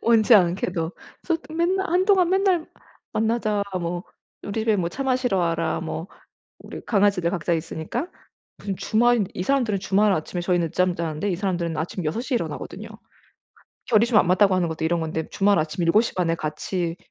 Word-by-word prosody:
원치 230 Hz, 0 st, +5 dB
않게도 175 Hz, -2 st, +1 dB, 0.3 s
솟 335 Hz, -2 st, 0 dB, 0.2 s
맨날 375 Hz, +3 st, +1 dB
한동안 370 Hz, 0 st, +3 dB
맨날 380 Hz, -4 st, +2 dB, 0.5 s
"만나자." 215 Hz, -2 st, 0 dB, 0.2 s
뭐 175 Hz, +2 st, -3 dB, 0.4 s
"우리 205 Hz, +2 st, -3 dB
집에 220 Hz, -1 st, +2 dB
뭐 175 Hz, -3 st, -1 dB
차 275 Hz, -, -5 dB
마시러 255 Hz, -6 st, +1 dB
와라." 165 Hz, -2 st, 0 dB
뭐 165 Hz, +1 st, -5 dB, 0.5 s
우리 -, -, -9 dB
강아지들 200 Hz, -5 st, +2 dB
각자 170 Hz, -2 st, -1 dB
있으니까 165 Hz, -, -3 dB, 0.5 s
무슨 200 Hz, -2 st, -4 dB
주말 235 Hz, 0 st, +2 dB
이 180 Hz, -, -3 dB
사람들은 240 Hz, -7 st, +1 dB
주말 200 Hz, +2 st, +2 dB
아침에 175 Hz, +1 st, -3 dB
저희는 175 Hz, -2 st, +1 dB
늦잠 180 Hz, +1 st, +1 dB
자는데 165 Hz, +3 st, -2 dB
이 180 Hz, -, 0 dB
사람들은 175 Hz, -4 st, -2 dB
아침 170 Hz, +3 st, -3 dB
6:00 235 Hz, -, -2 dB
에 -, -, +4 dB
일어나거든요. -, -, -5 dB, 1.0 s
결이 225 Hz, 0 st, +4 dB
좀 235 Hz, -3 st, +2 dB
안 -, -, +2 dB
맞다고 185 Hz, +1 st, +4 dB
하는 175 Hz, -2 st, +1 dB
것도 160 Hz, 0 st, -5 dB
이런 170 Hz, +1 st, +1 dB
건데 160 Hz, 0 st, -3 dB
주말 200 Hz, -3 st, +2 dB
아침 155 Hz, +3 st, -2 dB
7:30 180 Hz, -1 st, +2 dB
에 165 Hz, -, +2 dB
같이 165 Hz, +3 st, -3 dB
190 Hz, 345 characters per minute, -23 LUFS, 170-230 Hz, 1.0 s, 원치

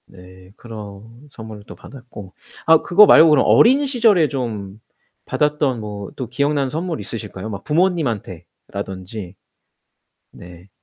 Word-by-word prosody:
네. 90 Hz, 0 st, -17 dB
그런 105 Hz, -4 st, -10 dB, 0.3 s
선물을 110 Hz, -4 st, -11 dB
또 -, -, -11 dB
받았고. 115 Hz, -8 st, -13 dB, 0.3 s
아 160 Hz, 0 st, +5 dB
그거 210 Hz, +5 st, +6 dB
말고 165 Hz, -5 st, +7 dB
그럼 150 Hz, -3 st, +3 dB
어린 270 Hz, +5 st, +5 dB
시절에 225 Hz, -, +3 dB
좀 110 Hz, -7 st, -6 dB, 0.5 s
받았던 150 Hz, -4 st, -1 dB
뭐 105 Hz, -2 st, -8 dB
또 130 Hz, -, -6 dB
기억나는 140 Hz, +2 st, -1 dB
선물 165 Hz, +3 st, -4 dB
있으실까요 105 Hz, -2 st, -7 dB
막 100 Hz, -3 st, -7 dB
부모님한테라던지? 100 Hz, -, -4 dB, 1.0 s
네. 90 Hz, +2 st, -15 dB
115 Hz, 270 characters per minute, -19 LUFS, 100-150 Hz, 1.0 s, 말고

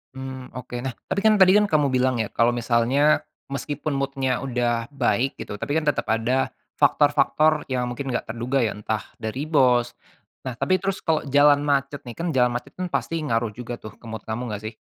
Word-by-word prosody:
Mmm, 130 Hz, -1 st, -8 dB
oke. 125 Hz, -1 st, -7 dB
Nah, 130 Hz, 0 st, -4 dB, 0.2 s
tapi, 200 Hz, -, 0 dB
kan, 215 Hz, -, +7 dB
tadi, 190 Hz, -2 st, +6 dB
kan, 210 Hz, -, +4 dB
kamu 150 Hz, -4 st, +2 dB
bilang, 130 Hz, 0 st, +2 dB
ya, -, -, -4 dB
kalau 120 Hz, +1 st, +2 dB
misalnya, 120 Hz, +5 st, +2 dB, 0.3 s
meski 145 Hz, +1 st, -3 dB
pun 155 Hz, -, -2 dB
mood-nya 135 Hz, -2 st, -1 dB
udah 120 Hz, -2 st, 0 dB
baik, 135 Hz, -1 st, 0 dB
gitu, 105 Hz, -, -6 dB
tapi, 145 Hz, -, -2 dB
kan, 160 Hz, -, +1 dB
tetap 145 Hz, -, 0 dB
ada 115 Hz, +4 st, +1 dB, 0.3 s
faktor-faktor 155 Hz, -1 st, +3 dB
yang 125 Hz, -2 st, -1 dB
mungkin 135 Hz, +3 st, -5 dB
nggak 120 Hz, -, -3 dB
terduga, 120 Hz, +3 st, 0 dB
ya, 110 Hz, -, +1 dB
entah 110 Hz, +1 st, -2 dB, 0.2 s
dari 110 Hz, +6 st, -3 dB
bos, 125 Hz, -5 st, +3 dB, 0.5 s
nah, 125 Hz, -2 st, -4 dB
tapi 185 Hz, +8 st, +1 dB
terus 195 Hz, 0 st, -3 dB
kalau 160 Hz, -2 st, +1 dB
jalan 145 Hz, +1 st, +5 dB
macet, 140 Hz, 0 st, 0 dB
nih, 120 Hz, -, -7 dB
kan, 170 Hz, -, -2 dB
jalan 125 Hz, -3 st, +3 dB
macet, -, -, -5 dB
kan, 180 Hz, -, -1 dB
pasti 165 Hz, 0 st, -1 dB
ngaruh 115 Hz, -6 st, -1 dB
juga, 120 Hz, +2 st, -6 dB
tuh, 110 Hz, -2 st, -10 dB
ke -, -, -17 dB
mood 110 Hz, -2 st, -6 dB
kamu 110 Hz, +2 st, -4 dB
nggak, 105 Hz, -, -5 dB
sih? 110 Hz, +1 st, -5 dB
130 Hz, 205 wpm, -24 LUFS, 120-145 Hz, 0.5 s, kan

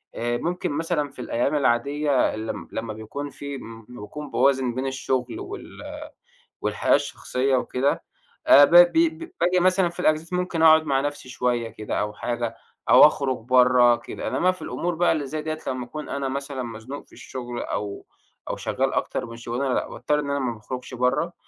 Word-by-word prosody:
آآ، 120 Hz, +1 st, -1 dB
ممكن 175 Hz, +3 st, -2 dB
مثلًا 155 Hz, -1 st, -1 dB
في 135 Hz, -, -18 dB
الأيام 125 Hz, +4 st, 0 dB
العادية 140 Hz, +1 st, +2 dB
لم 110 Hz, -5 st, -5 dB
لمّا 110 Hz, -1 st, -4 dB
بيكون 110 Hz, +7 st, -6 dB
في 140 Hz, 0 st, -7 dB
لمّا 115 Hz, -3 st, -11 dB, 0.2 s
باكون 145 Hz, +7 st, -8 dB
باوازن 130 Hz, -3 st, +2 dB
بين 130 Hz, +1 st, -2 dB
الشغل 135 Hz, -, -2 dB
وال 395 Hz, +1 st, -7 dB, 0.9 s
والحياة -, -, +2 dB
الشخصية 130 Hz, +1 st, -1 dB
وكده 130 Hz, +2 st, 0 dB, 0.4 s
آآ، 145 Hz, -, +9 dB
ب -, -, -6 dB
ب 175 Hz, 0 st, +9 dB
ب 165 Hz, -1 st, +1 dB
باجي 180 Hz, +1 st, +3 dB
مثلًا 185 Hz, 0 st, +3 dB
في 175 Hz, -, -12 dB
الأجازات 155 Hz, +3 st, +1 dB
ممكن 180 Hz, -2 st, -1 dB
أقعد 160 Hz, 0 st, +7 dB
مع 135 Hz, -2 st, +1 dB
نفسي 145 Hz, -2 st, -4 dB
شوية 125 Hz, -2 st, -1 dB
كده 110 Hz, -1 st, -4 dB
أو 105 Hz, 0 st, -2 dB
حاجة، 120 Hz, +1 st, -3 dB, 0.3 s
أو -, -, +10 dB
أخرج 135 Hz, -4 st, -1 dB
برّه 125 Hz, 0 st, +5 dB
كده، -, -, -7 dB
إنّما 170 Hz, +8 st, +2 dB
في 185 Hz, -, -12 dB
الأمور 175 Hz, 0 st, -3 dB
بقى 175 Hz, +2 st, +3 dB
اللي 155 Hz, -3 st, -1 dB
زي 155 Hz, +3 st, -4 dB
دي 155 Hz, 0 st, -3 dB
لمّا 130 Hz, -2 st, -2 dB
أكون 150 Hz, +3 st, -7 dB
أنا 140 Hz, -1 st, -2 dB
مثلًا 140 Hz, -1 st, -4 dB
مزنوق 120 Hz, +4 st, -8 dB
في -, -, -24 dB
الشغل 120 Hz, -2 st, -7 dB
أو 100 Hz, -1 st, -4 dB, 0.4 s
أو -, -, -3 dB
شغال -, -, -1 dB
أكتر -, -, -1 dB
من 115 Hz, 0 st, -9 dB
شغلانة، 120 Hz, +3 st, -2 dB
لأ، -, -, 0 dB
باضطر 150 Hz, 0 st, -1 dB
إن 145 Hz, -1 st, -3 dB
أنا 140 Hz, 0 st, 0 dB
ما 125 Hz, -3 st, -1 dB
باخرجش 125 Hz, +4 st, -8 dB
برّه، 125 Hz, +7 st, 0 dB
135 Hz, 185 wpm, -24 LUFS, 120-155 Hz, 0.9 s, أو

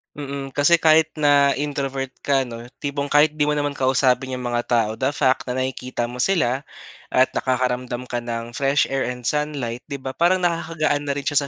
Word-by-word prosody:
Mm, 140 Hz, -1 st, -6 dB
kasi 145 Hz, +5 st, +4 dB
kahit 160 Hz, -1 st, +4 dB
na 145 Hz, -2 st, +4 dB
introvert 135 Hz, -2 st, -3 dB
ka, 135 Hz, -2 st, +1 dB
'no, 120 Hz, -1 st, -8 dB, 0.2 s
tipong 140 Hz, 0 st, -2 dB
kahit 150 Hz, +1 st, +4 dB
'di 150 Hz, -1 st, 0 dB
mo 150 Hz, -, +1 dB
naman 145 Hz, -1 st, 0 dB
kausapin 130 Hz, -1 st, +1 dB
'yong 125 Hz, -, -6 dB
mga 120 Hz, 0 st, 0 dB
tao, 115 Hz, -3 st, +2 dB
the 130 Hz, -, +1 dB
fact 130 Hz, -2 st, +1 dB
na 125 Hz, -, -2 dB
nakikita 130 Hz, -1 st, -3 dB
mo 120 Hz, +1 st, -5 dB
sila 135 Hz, -4 st, +1 dB, 0.4 s
at 130 Hz, 0 st, +3 dB
nakakaramdam 125 Hz, -1 st, -1 dB
ka 120 Hz, -, -1 dB
ng 120 Hz, 0 st, -5 dB
fresh 135 Hz, +4 st, +1 dB
air 135 Hz, 0 st, 0 dB
and 125 Hz, 0 st, -5 dB
sunlight, 140 Hz, -4 st, -1 dB
'di 140 Hz, -, -5 dB
ba, 130 Hz, -, -3 dB
parang 180 Hz, +4 st, +2 dB
nakakagaan 155 Hz, -4 st, 0 dB
na 140 Hz, -, 0 dB
rin 145 Hz, -, -4 dB
siya 145 Hz, 0 st, +1 dB
135 Hz, 195 wpm, -22 LUFS, 125-145 Hz, 0.4 s, kasi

